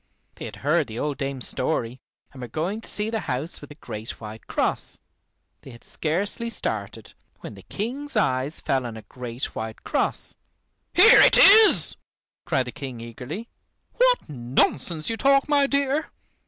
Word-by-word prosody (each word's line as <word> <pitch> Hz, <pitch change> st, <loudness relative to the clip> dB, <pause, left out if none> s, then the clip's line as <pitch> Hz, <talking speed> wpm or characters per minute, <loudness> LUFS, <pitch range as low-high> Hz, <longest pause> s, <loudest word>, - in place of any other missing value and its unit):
They -, -, -9 dB
had -, -, -8 dB
heard 150 Hz, -1 st, +2 dB
the 110 Hz, -1 st, -8 dB
old 145 Hz, +2 st, -3 dB
dame's 135 Hz, -2 st, -2 dB
story, 125 Hz, 0 st, -2 dB, 0.3 s
and 130 Hz, -, -11 dB
were 125 Hz, -, -5 dB
going 170 Hz, -, -3 dB
to -, -, -7 dB
see 210 Hz, +1 st, 0 dB
the 225 Hz, -, -1 dB
house 135 Hz, +6 st, -1 dB
with 145 Hz, -, -10 dB
the 145 Hz, -, -13 dB
great 110 Hz, -6 st, -7 dB
white 110 Hz, 0 st, -10 dB
cross. -, -, -2 dB, 0.6 s
They -, -, -13 dB
had 115 Hz, -2 st, -14 dB
scarcely 200 Hz, +9 st, -1 dB
started, -, -, -5 dB, 0.3 s
when -, -, -8 dB
the -, -, -13 dB
King's 255 Hz, +6 st, -4 dB
eyes 135 Hz, -5 st, 0 dB
fell 130 Hz, -2 st, -1 dB
on 115 Hz, -1 st, -8 dB
a 110 Hz, -, -10 dB
great 125 Hz, +1 st, -6 dB
white 110 Hz, 0 st, -6 dB
cross! -, -, -2 dB, 0.6 s
"Here 435 Hz, +7 st, +8 dB
it -, -, +6 dB
is," 430 Hz, +2 st, +7 dB, 0.5 s
cried 130 Hz, -, 0 dB
the 125 Hz, -, -6 dB
King 130 Hz, -3 st, -7 dB
eagerly. 125 Hz, -, -7 dB, 0.5 s
"What -, -, +2 dB
nonsense 145 Hz, +4 st, 0 dB
you 225 Hz, -, -1 dB
talk, 275 Hz, +3 st, +3 dB
my 285 Hz, -2 st, +3 dB
dear! 280 Hz, +2 st, 0 dB
150 Hz, 170 wpm, -24 LUFS, -, 0.6 s, Here